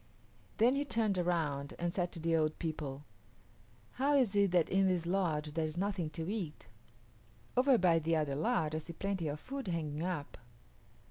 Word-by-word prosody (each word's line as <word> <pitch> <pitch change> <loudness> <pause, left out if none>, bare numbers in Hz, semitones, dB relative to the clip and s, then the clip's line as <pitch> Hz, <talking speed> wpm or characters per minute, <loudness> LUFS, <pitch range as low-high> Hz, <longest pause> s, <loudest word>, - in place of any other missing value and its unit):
Then 235 +4 +5
he 280 - +1
turned 220 -8 0
around 155 -5 -1
and 175 0 -2
said 180 -2 -1
to 170 - -6
the 165 0 +1
old 155 -1 +1
people, 150 -3 -4 0.9
"How 280 +3 +1
is 245 -8 +3
it 200 -1 +4
that 175 -2 +3
in 195 0 +3
this 180 -3 +1
lodge 165 -5 0
there 160 0 0
is 155 +2 -7
nothing 190 -4 -1
to 165 0 -3
eat? 185 -7 -4 0.9
Over 255 0 +5
by 175 -5 +4
the 165 +1 +1
other 150 -3 0
lodge 155 - +1
I 155 - 0
see 165 +2 -8
plenty 190 -2 -2
of 150 +1 -3
food 270 - -6
hanging 155 -3 -2
up." 170 -5 -3
170 Hz, 185 wpm, -34 LUFS, 155-200 Hz, 0.9 s, Then